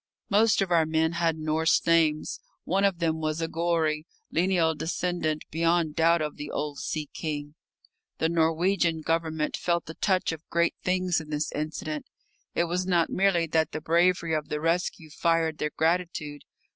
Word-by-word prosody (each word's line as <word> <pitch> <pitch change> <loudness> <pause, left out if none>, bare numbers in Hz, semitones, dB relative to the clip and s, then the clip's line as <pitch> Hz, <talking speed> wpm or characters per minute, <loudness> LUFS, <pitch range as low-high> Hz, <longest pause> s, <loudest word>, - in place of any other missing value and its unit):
Most 215 0 +4
of 185 - -6
our 165 -2 +4
men 160 0 +1
had 170 -2 0
Norse 155 +1 +1
names. 160 -2 +2 0.2
One 195 +3 0
of 195 -3 +2
them 165 -2 0
was 155 0 -1
a 165 - -1
Gorry, 165 -2 0 0.2
lineal 170 -1 +2
descendant 160 -1 -2
beyond 165 -1 +1
doubt 165 0 +3
of 150 - -4
the 145 0 -6
old 145 -1 -3
sea 155 -2 -3
king. 145 -2 -4 0.6
The 160 - +1
Norwegian 165 +1 +1
Government 160 -1 -1
felt 170 -1 0
the 160 - -7
touch 185 0 +1
of 160 0 -9
great 170 0 +2
things 180 -2 +1
in 155 - -12
this 150 0 -2
incident. 155 0 -4 0.5
It - - +3
was 180 +2 -1
not 175 -3 +2
merely 190 -3 +2
that 160 -1 0
the - - -2
bravery 170 +1 +2
of 155 -1 -2
the 150 - -2
rescue 165 -1 -1
fired 165 -1 +1
their 150 - 0
gratitude. 160 -3 -1
165 Hz, 170 wpm, -27 LUFS, 155-175 Hz, 0.6 s, Most